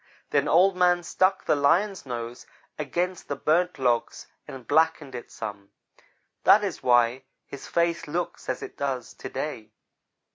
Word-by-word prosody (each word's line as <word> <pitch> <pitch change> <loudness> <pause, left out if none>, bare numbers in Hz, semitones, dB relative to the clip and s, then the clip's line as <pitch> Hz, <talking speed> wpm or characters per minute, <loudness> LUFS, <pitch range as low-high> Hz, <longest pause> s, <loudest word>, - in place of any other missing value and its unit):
Then 140 0 +2
Old 185 +3 +4
man 180 -1 +3
stuck 190 +2 +1
the - - +3
Lion's 175 +5 +1
nose 120 -1 -6 0.3
against 175 +5 -2
the 145 - -2
burnt 170 +5 +1
logs 120 -3 0 0.2
and 130 -2 -10
blackened 160 -2 +2
it 120 - -7
some 100 -1 -7 0.7
that 210 - +6
is 190 -6 -3
why 120 +1 +3 0.2
his 140 - -9
face 170 -1 0
looks 175 +4 -4
as 130 - -2
it - - -9
does 130 -4 -3
to - - -8
day. - - -5
145 Hz, 150 wpm, -26 LUFS, 125-175 Hz, 0.7 s, that